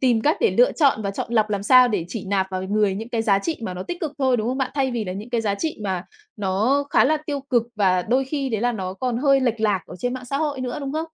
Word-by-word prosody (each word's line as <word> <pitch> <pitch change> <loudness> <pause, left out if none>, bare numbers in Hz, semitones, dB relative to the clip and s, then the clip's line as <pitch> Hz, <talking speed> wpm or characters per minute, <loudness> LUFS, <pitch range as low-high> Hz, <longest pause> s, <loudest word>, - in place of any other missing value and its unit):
tìm 245 -4 +3
cách 300 +5 +2
để 460 - +4
lựa - - +4
chọn 275 -8 +2
và 200 - -1
chọn 200 - -5
lọc 215 -2 +2
làm 200 -1 -1
sao 255 +3 +6
để 205 -7 -1
chỉ 200 +3 -5
nạp 190 -1 +1
vào 185 0 -3
người 205 0 +1
những 220 +4 -6
cái 230 -2 -1
giá 200 -3 +3
trị 315 +10 -3
mà 185 -4 -4
nó 180 - -5
tích 350 - -6
cực 310 -5 -3
thôi, 260 -2 +2
đúng 220 +1 -1
không 260 - -2
bạn? 265 -1 -1
Thay 270 -2 +1
vì 235 -3 -2
là 185 - -4
những 210 +5 -8
cái 235 -2 +1
giá 205 -3 0
trị 315 +7 -3
mà 190 -3 -2 0.3
nó 215 +8 +1
khá - - +5
là 310 +3 +3
tiêu 285 -2 -2
cực 240 -3 +4
và 185 -3 +2
đôi 255 +7 +1
khi 275 0 -2
đấy 220 -4 -2
là 245 +1 +1
nó 190 -4 -4
còn 250 +2 -2
hơi 275 0 +4
lệch 235 -3 0
lạc 210 -4 +2
ở - - -10
trên 245 +6 -2
mạng 255 0 -7
xã 275 +3 -3
hội 295 -3 -2
nữa, 250 +1 -3
đúng 275 0 -4
không? 315 - -1
235 Hz, 315 wpm, -22 LUFS, 200-270 Hz, 0.3 s, sao